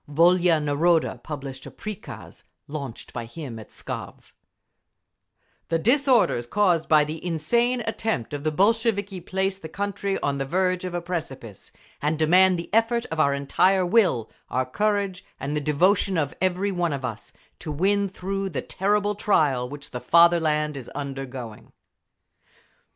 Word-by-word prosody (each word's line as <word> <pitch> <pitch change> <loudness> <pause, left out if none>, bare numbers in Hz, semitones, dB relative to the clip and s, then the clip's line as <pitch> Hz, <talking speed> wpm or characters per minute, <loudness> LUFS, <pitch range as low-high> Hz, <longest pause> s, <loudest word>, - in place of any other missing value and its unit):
Volia 170 +2 +4
Naroda 155 +3 +1
published 135 -3 -7
a - - -7
prikaz 215 -1 -9 0.2
launched 140 -5 -7
by 120 -1 -4
him 120 -2 -8
at 110 - -12
Pskov: - - -8 1.4
The 165 - +1
disorders 240 - +3
caused 180 -2 +2
by 155 -2 +6
the 155 +2 -6
insane 235 +10 +1
attempt 220 - -2
of 145 -1 -4
the 155 - +1
Bolsheviki 205 +1 +1
place 190 +2 -2
the 160 - -8
country 200 +1 -2
on 140 -1 -1
the 135 - -1
verge 185 +4 0
of 180 -1 -4
a 175 - -1
precipice, 135 - -6 0.3
and 150 +2 0
demand 180 +4 +5
the 170 - -7
effort 230 +2 +2
of 160 - -3
our 140 -2 +3
entire 185 +7 +2
will, 175 - +2 0.2
our 130 0 0
courage 200 +5 -1 0.2
and 145 +2 -3
the 150 - 0
devotion 180 +6 +2
of 145 -3 -1
every 185 +2 +1
one 175 -4 0
of 135 -2 -4
us, 115 -3 -6 0.3
to 155 - -5
win 200 +6 +1
through 195 +1 -3
the 160 - -4
terrible 205 +1 0
trial 145 -12 +1
which 145 +1 -9
the 125 - -5
fatherland 160 -3 +4
is 130 -4 -8
undergoing…. 135 -5 -6
170 Hz, 150 wpm, -25 LUFS, 145-195 Hz, 1.4 s, by